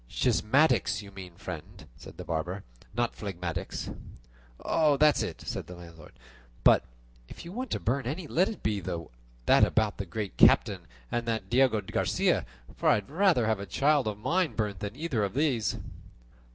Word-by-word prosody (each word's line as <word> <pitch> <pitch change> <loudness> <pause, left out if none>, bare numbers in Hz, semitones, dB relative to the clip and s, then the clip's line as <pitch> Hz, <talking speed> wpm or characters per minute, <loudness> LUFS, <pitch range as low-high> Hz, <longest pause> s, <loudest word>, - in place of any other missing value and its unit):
"Schismatics 130 -2 +2
you 100 - -12
mean, 95 -3 -10
friend," 75 - -8
said - - -13
the - - -6
barber, 85 +4 -3 0.3
"not 120 0 0
phlegmatics." 90 -5 -4 0.7
"That's 150 -1 +4
it," - - -4
said - - -5
the 90 - -9
landlord; 85 -3 -13 0.5
"but - - +6 0.4
if - - -10
you 170 - -8
want 255 +6 -4
to - - -1
burn 125 +2 -1
any, 160 +7 -3
let 180 +5 +2
it 220 - -8
be 105 -2 0
that - - -1
about 110 -2 +2
the 100 - -5
Great 105 +2 -5
Captain - - +4 0.2
and 120 0 -2
that 115 0 -2
Diego 125 -3 +4
Garcia; 95 - 0 0.3
for - - +1
I - - +6
would 105 +4 -4
rather 175 - +3
have 110 -2 +1
a 100 - -6
child 145 -3 +2
of 105 -1 -2
mine 165 - 0
burnt 105 -4 -2
than 105 +3 -5
either 140 -7 -1
of 100 +3 -3
the 150 +3 +3
others." 115 -6 -1
110 Hz, 175 wpm, -29 LUFS, 95-145 Hz, 0.7 s, but